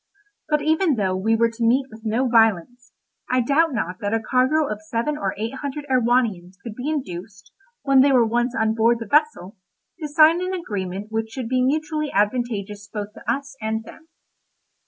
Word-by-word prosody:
But 300 Hz, -1 st, +1 dB
even 315 Hz, 0 st, +2 dB
though 190 Hz, -4 st, 0 dB
we 220 Hz, +4 st, +1 dB
were 230 Hz, 0 st, +2 dB
to 230 Hz, +1 st, -5 dB
meet 255 Hz, +4 st, +3 dB
with 220 Hz, +1 st, -12 dB
no 235 Hz, +4 st, 0 dB
violence, 230 Hz, +1 st, +2 dB, 0.4 s
I 255 Hz, -, +2 dB
doubt 290 Hz, +6 st, +2 dB
not 185 Hz, -7 st, -3 dB
that 205 Hz, +2 st, -1 dB
a -, -, +1 dB
cargo 260 Hz, +7 st, +2 dB
of 215 Hz, -3 st, -5 dB
seven 230 Hz, +7 st, -2 dB
or 195 Hz, -9 st, -3 dB
eight 225 Hz, +4 st, -3 dB
hundred 285 Hz, +1 st, -5 dB
Erewhonians 230 Hz, -8 st, +1 dB
could 230 Hz, -, -6 dB
be 250 Hz, +6 st, -4 dB
induced, 200 Hz, -, -6 dB, 0.3 s
when 275 Hz, -2 st, +5 dB
they 280 Hz, +1 st, +4 dB
were 250 Hz, -3 st, +5 dB
once 240 Hz, +2 st, 0 dB
on 220 Hz, 0 st, +1 dB
board 230 Hz, +1 st, +3 dB
the 230 Hz, -, -6 dB
vessel, 260 Hz, -, 0 dB, 0.4 s
to 310 Hz, -, -4 dB
sign 315 Hz, +3 st, +5 dB
an 370 Hz, +1 st, -2 dB
agreement 205 Hz, -, -5 dB
which 220 Hz, 0 st, -2 dB
should 240 Hz, +1 st, -5 dB
be 255 Hz, +1 st, +1 dB
mutually 305 Hz, +2 st, -1 dB
advantageous 205 Hz, -2 st, -1 dB
both 205 Hz, 0 st, -6 dB
to -, -, -3 dB
us 275 Hz, 0 st, -4 dB
and 220 Hz, +1 st, -2 dB
them. 320 Hz, +7 st, -14 dB
235 Hz, 190 wpm, -22 LUFS, 215-280 Hz, 0.4 s, when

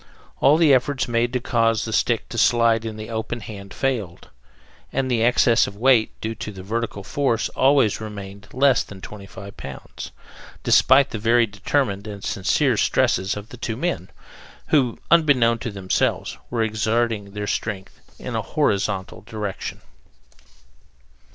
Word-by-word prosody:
All 150 Hz, +3 st, +5 dB
the 160 Hz, -4 st, +5 dB
efforts 130 Hz, +1 st, +1 dB
made 120 Hz, 0 st, +1 dB
to 125 Hz, -, +1 dB
cause 115 Hz, -2 st, +1 dB
the 110 Hz, -, -4 dB
stick 115 Hz, 0 st, +1 dB
to 115 Hz, -, -6 dB
slide 115 Hz, 0 st, +3 dB
in 110 Hz, -1 st, -5 dB
the 110 Hz, +1 st, -7 dB
open 115 Hz, +2 st, -3 dB
hand 100 Hz, -2 st, -9 dB
failed, 115 Hz, -11 st, -3 dB, 0.6 s
and 130 Hz, -1 st, -1 dB
the 115 Hz, -2 st, +1 dB
excess 120 Hz, 0 st, +4 dB
of -, -, -8 dB
weight 120 Hz, 0 st, +3 dB
due 110 Hz, +1 st, -3 dB
to 110 Hz, -1 st, -6 dB
the 95 Hz, -2 st, -10 dB
vertical 110 Hz, -1 st, -3 dB
force 125 Hz, -1 st, 0 dB
always 130 Hz, -6 st, +3 dB
remained 100 Hz, -1 st, -8 dB
less 135 Hz, 0 st, +3 dB
than 100 Hz, -, -9 dB
twenty 100 Hz, 0 st, -9 dB
five 100 Hz, +2 st, -11 dB
pounds, 70 Hz, -1 st, -8 dB, 0.5 s
despite 135 Hz, +1 st, +5 dB
the 110 Hz, -, -4 dB
very 115 Hz, +2 st, +4 dB
determined 105 Hz, 0 st, -1 dB
and 100 Hz, -2 st, -8 dB
sincere 120 Hz, +6 st, +1 dB
stresses 95 Hz, 0 st, +1 dB
of 105 Hz, +2 st, -8 dB
the 125 Hz, -, -10 dB
two 115 Hz, -1 st, -4 dB
men, 155 Hz, -, -2 dB, 0.6 s
who, 130 Hz, -6 st, +2 dB
unbeknown 135 Hz, -8 st, +4 dB
to 120 Hz, -, -4 dB
themselves, 95 Hz, -3 st, -1 dB
were 115 Hz, -2 st, 0 dB
exerting 110 Hz, -1 st, -1 dB
their 105 Hz, 0 st, -4 dB
strength 100 Hz, -2 st, -4 dB, 0.2 s
in -, -, -6 dB
a -, -, 0 dB
HORIZONTAL 100 Hz, -1 st, -1 dB
direction. 105 Hz, -4 st, -5 dB
115 Hz, 155 wpm, -22 LUFS, 100-125 Hz, 0.6 s, All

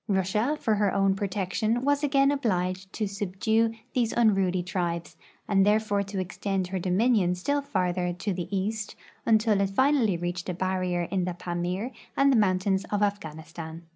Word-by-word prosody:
Russia, 210 Hz, +8 st, +1 dB
for 220 Hz, -, +1 dB
her 205 Hz, -2 st, +2 dB
own 195 Hz, -1 st, +2 dB
protection, 205 Hz, +4 st, -1 dB
was 285 Hz, +1 st, +2 dB
again 275 Hz, -1 st, +3 dB
obliged 190 Hz, -8 st, -1 dB
to 215 Hz, -, -2 dB
subdue 205 Hz, +3 st, 0 dB, 0.2 s
these 235 Hz, -3 st, +1 dB
unruly 195 Hz, -6 st, +2 dB
tribes, 170 Hz, -2 st, -3 dB, 0.3 s
and 195 Hz, -2 st, +4 dB
thereby 210 Hz, 0 st, +2 dB
to 200 Hz, 0 st, -4 dB
extend 190 Hz, +1 st, -2 dB
her 190 Hz, 0 st, -2 dB
dominion 185 Hz, 0 st, +2 dB
still 285 Hz, +11 st, 0 dB
farther 180 Hz, -8 st, -1 dB
to 185 Hz, +3 st, -3 dB
the 175 Hz, -2 st, -4 dB
east, 210 Hz, +2 st, -2 dB, 0.3 s
until 215 Hz, -2 st, +3 dB
it 195 Hz, -, +1 dB
finally 245 Hz, -3 st, +2 dB
reached 175 Hz, +1 st, -4 dB
a 180 Hz, -, -2 dB
barrier 185 Hz, -1 st, -1 dB
in 185 Hz, -3 st, 0 dB
the 180 Hz, -1 st, -3 dB
Pamir 180 Hz, +6 st, -3 dB, 0.3 s
and 275 Hz, 0 st, +5 dB
tlie 235 Hz, -, +4 dB
mountains 190 Hz, -1 st, +2 dB
of 205 Hz, 0 st, -1 dB
Afghanistan. 165 Hz, -4 st, -4 dB
195 Hz, 165 wpm, -27 LUFS, 180-220 Hz, 0.3 s, and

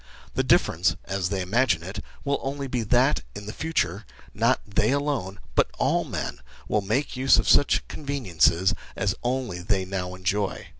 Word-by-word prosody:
The -, -, +1 dB
difference, 85 Hz, +2 st, +3 dB
as 95 Hz, -1 st, -1 dB
they 95 Hz, -1 st, -1 dB
imagine 95 Hz, -3 st, +2 dB
it, 100 Hz, +4 st, -6 dB, 0.2 s
will 140 Hz, 0 st, 0 dB
only 140 Hz, +1 st, -3 dB
be 125 Hz, -2 st, -2 dB
that, 110 Hz, -, +3 dB
in 100 Hz, -, -7 dB
the 105 Hz, -, -6 dB
future, 110 Hz, -, -1 dB, 0.3 s
not 115 Hz, +4 st, +2 dB
they 100 Hz, -, +1 dB
alone, 140 Hz, -9 st, -1 dB
but -, -, +3 dB
all -, -, +2 dB
men, -, -, -4 dB, 0.3 s
will 105 Hz, -, +1 dB
make 110 Hz, +10 st, -1 dB
use 130 Hz, +1 st, +5 dB
of -, -, +1 dB
such 145 Hz, -, +4 dB
conveniences 100 Hz, -, +1 dB, 0.2 s
as 100 Hz, -1 st, 0 dB
only 125 Hz, -7 st, -1 dB
they 95 Hz, +1 st, 0 dB
now 90 Hz, -1 st, -4 dB
enjoy. 95 Hz, +2 st, -2 dB
105 Hz, 165 wpm, -25 LUFS, 95-130 Hz, 0.3 s, use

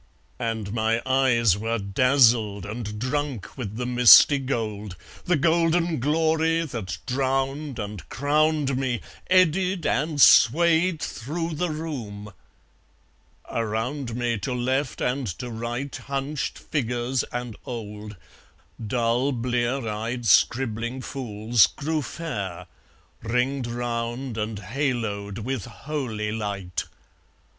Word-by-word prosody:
And 110 Hz, -3 st, -3 dB
my 110 Hz, 0 st, +1 dB
eyes 130 Hz, -6 st, +3 dB
Were 115 Hz, +3 st, -1 dB
dazzled 110 Hz, -1 st, +3 dB
and 105 Hz, 0 st, -5 dB
drunk 130 Hz, -, -3 dB
with 110 Hz, -6 st, -5 dB
the 125 Hz, +2 st, -3 dB
misty 125 Hz, +3 st, +8 dB
gold, 110 Hz, -7 st, -3 dB, 0.3 s
The 180 Hz, -, +3 dB
golden 165 Hz, +1 st, +2 dB
glory 160 Hz, +3 st, +2 dB
that 105 Hz, -, -5 dB
drowned 135 Hz, +2 st, -1 dB
and 105 Hz, -3 st, -6 dB
crowned 150 Hz, -1 st, +1 dB
me 130 Hz, -3 st, -1 dB, 0.3 s
Eddied 185 Hz, -1 st, +3 dB
and 150 Hz, +2 st, 0 dB
swayed 165 Hz, +6 st, +5 dB
through 165 Hz, +7 st, -4 dB
the 175 Hz, +3 st, -1 dB
room... 120 Hz, -11 st, -6 dB, 1.2 s
Around 115 Hz, +3 st, -2 dB
me, 120 Hz, -2 st, -1 dB
To 125 Hz, +6 st, -3 dB
left 130 Hz, +2 st, -1 dB
and 130 Hz, 0 st, -1 dB
to 125 Hz, -1 st, -6 dB
right, 120 Hz, +4 st, -4 dB
Hunched 140 Hz, +1 st, -3 dB
figures 125 Hz, -2 st, -1 dB
and 120 Hz, -2 st, -5 dB
old, 105 Hz, -3 st, -7 dB, 0.7 s
Dull 120 Hz, +4 st, +1 dB
blear 125 Hz, 0 st, -1 dB
eyed 115 Hz, +3 st, -3 dB
scribbling 120 Hz, +3 st, +2 dB
fools, 115 Hz, -6 st, +2 dB
grew 155 Hz, +6 st, -2 dB
fair, 110 Hz, -, -5 dB, 0.6 s
Ringed 125 Hz, +3 st, 0 dB
round 120 Hz, +1 st, -3 dB
and 105 Hz, 0 st, -3 dB
haloed 105 Hz, -3 st, -2 dB
with 130 Hz, -6 st, -3 dB
holy 115 Hz, -4 st, -4 dB
light. 100 Hz, -5 st, -3 dB
125 Hz, 110 wpm, -25 LUFS, 110-140 Hz, 1.2 s, misty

